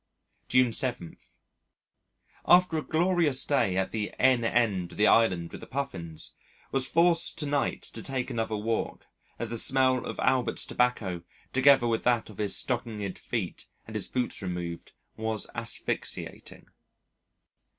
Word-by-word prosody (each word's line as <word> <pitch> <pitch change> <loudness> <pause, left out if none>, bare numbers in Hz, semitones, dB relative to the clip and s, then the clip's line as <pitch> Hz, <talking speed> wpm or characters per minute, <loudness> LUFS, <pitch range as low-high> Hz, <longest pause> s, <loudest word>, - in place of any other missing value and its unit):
June 125 -2 +3
7. 120 -9 -1 1.3
After 180 -2 +5
a 155 - 0
glorious 160 -5 +2
day 100 -10 +1
at 95 0 0
the 105 -2 -2
N. 130 -2 +4
end 110 -7 0
of - - -12
the 105 - +4
Island 90 -8 +3
with - - -9
the - - -10
Puffins, 95 - -5 0.4
was 135 -1 +1
forced 170 +2 +3
to 150 - +1
night 145 -1 -1
to - - -6
take 130 -2 -3
another 110 -1 -2
walk, 110 +2 -3 0.3
as - - -3
the 115 - +1
smell 130 0 +3
of - - -5
Albert's 130 -2 +1
tobacco, 105 -8 0 0.3
together 135 -1 +5
with 115 -1 0
that 120 -3 +1
of 100 - -15
his 105 -2 +1
stockinged 110 -6 -3
feet - - -4 0.2
and - - -10
his - - 0
boots 125 -3 -2
removed, 90 -2 -5 0.3
was 110 -1 -1
asphyxiating. - - -4
120 Hz, 145 wpm, -28 LUFS, 105-135 Hz, 1.3 s, After